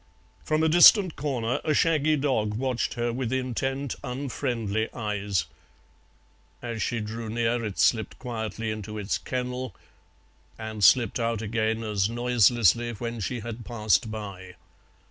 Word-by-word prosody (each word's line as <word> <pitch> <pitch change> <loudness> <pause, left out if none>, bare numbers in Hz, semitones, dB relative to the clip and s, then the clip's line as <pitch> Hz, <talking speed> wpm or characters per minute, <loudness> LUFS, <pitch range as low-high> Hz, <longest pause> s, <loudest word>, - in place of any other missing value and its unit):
From 155 +1 +1
a - - +4
distant 175 +2 +7
corner 125 -5 -2
a 155 - +1
shaggy 155 -1 +3
dog 130 -8 0
watched 125 0 -1
her 120 0 -1
with 125 -1 -3
intent 130 +1 -2
unfriendly 120 -5 -2
eyes; 105 -4 -1 1.1
as 115 -2 -5
she 120 - -1
drew 110 +1 -5
near 115 +1 0
it 105 -3 -4
slipped 110 -2 +2
quietly 115 -2 -4
into 110 0 -6
its 105 0 -2
kennel, 125 0 -4 0.8
and 110 -2 -5
slipped 120 +1 +5
out 115 -1 -1
again 110 +1 -1
as 105 -2 0
noiselessly 120 -1 +3
when 115 +1 -5
she 120 +3 -3
had 115 +1 -7
passed 110 -3 +1
by. 100 -4 -7
115 Hz, 135 wpm, -26 LUFS, 110-125 Hz, 1.1 s, distant